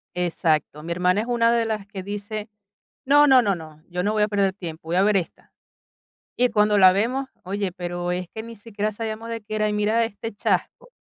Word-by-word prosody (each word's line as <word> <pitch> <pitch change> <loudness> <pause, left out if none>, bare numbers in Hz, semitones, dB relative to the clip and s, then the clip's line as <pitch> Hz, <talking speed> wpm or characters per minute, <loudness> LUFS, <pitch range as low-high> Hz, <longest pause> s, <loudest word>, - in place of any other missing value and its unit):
Exacto. 160 -3 0
Mi 170 - -5
hermana 180 +3 +2
es 230 - -5
una 235 -1 +3
de 230 -1 +2
las 215 -3 -3
que 195 -3 -7
dice: 205 +2 -5 0.6
"No, 290 +2 +6
no, 260 -3 +7
no, 200 -3 +1
no, 155 -2 -11
yo 180 0 -2
no 210 +2 +1
voy 215 -1 +1
a 210 - +3
perder 200 -2 +1
tiempo, 165 -4 -8
voy 175 - 0
a 190 - +4
ver 210 0 +3
esta". 175 - -4 0.8
Y 250 0 +3
cuando 210 -1 +3
la 185 -1 +8
vemos, 250 +7 0 0.2
oye, 195 -1 -2
pero 175 0 -3
es 180 -1 -3
que 220 - -5
ni 230 0 -10
siquiera 210 -1 -3
sabíamos 225 +1 -5
de 230 -1 -4
qué 215 +1 -5
era, 215 0 +1
y - - -1
mira 215 +2 +2
este 225 0 -6
chasco, - - -2
205 Hz, 225 wpm, -23 LUFS, 180-225 Hz, 0.8 s, la